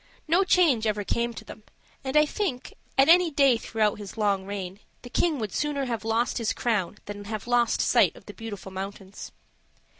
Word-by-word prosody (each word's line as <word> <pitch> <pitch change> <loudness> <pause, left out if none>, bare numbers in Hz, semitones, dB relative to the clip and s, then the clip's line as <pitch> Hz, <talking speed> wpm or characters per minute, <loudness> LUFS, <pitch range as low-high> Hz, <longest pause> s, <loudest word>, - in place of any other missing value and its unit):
No 345 +5 +4
change 310 - +3
ever 210 -1 -1
came 235 +4 -1
to - - -9
them; - - -11 0.4
and 265 +2 0
I 300 - +6
think, 300 -6 -3 0.2
at 270 - +6
any 350 +1 +6
day 275 -4 +4
throughout 215 -2 -1
his 205 +1 -9
long 200 -3 0
reign, 195 -1 -5 0.2
the 245 - -10
King 325 0 +1
would 215 -6 -4
sooner 290 -2 -1
have 230 -4 -3
lost 225 +3 0
his 225 -2 0
crown 210 -5 -1
than 205 0 -7
have 215 0 -5
lost 240 -1 +2
sight - - +3
of - - -16
the - - -9
Beautiful 205 -4 -8
Mountains. 195 +1 -7
225 Hz, 190 wpm, -26 LUFS, 205-275 Hz, 0.4 s, I